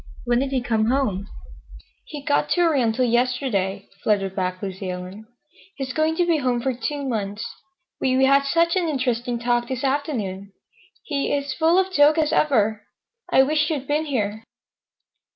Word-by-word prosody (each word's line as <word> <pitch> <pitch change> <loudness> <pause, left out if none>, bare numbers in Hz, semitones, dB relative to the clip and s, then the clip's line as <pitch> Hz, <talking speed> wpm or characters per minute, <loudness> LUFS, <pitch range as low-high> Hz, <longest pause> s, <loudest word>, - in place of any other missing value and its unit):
When 240 0 +2
did 270 +1 -1
he 265 -2 0
come 220 -2 +1
home?" 220 -6 0 0.8
"He 295 -2 -8
got 285 0 +1
to 350 - +2
Oriental 255 -7 +2
yesterday," 240 -5 0 0.2
fluttered 195 -3 +1
back 185 -1 -2
Lucy 190 -1 -5
Ellen. 185 +4 -7 0.5
"He's 265 -4 -4
going 315 +2 +1
to 350 - +2
be 335 -2 +2
home 250 -4 0
for 260 +2 -1
two 280 +3 -4
months. 210 -3 -3 0.5
We—we 260 0 +3
had 275 +1 +4
such 335 +4 +2
an 355 -3 +1
interesting 245 -4 -1
talk 240 0 0
this 260 0 -4
afternoon. 225 -9 -2 0.5
He—he's 280 -1 -1
as 280 - -3
full 330 +4 +3
of 380 0 +1
jokes 295 0 +5
as 310 -1 +1
ever. 220 -7 +2 0.5
I 265 - +6
wished 300 +2 +1
you'd 290 -4 -2
been 300 +2 0
here." 220 -6 -2
255 Hz, 165 wpm, -23 LUFS, 215-290 Hz, 0.8 s, I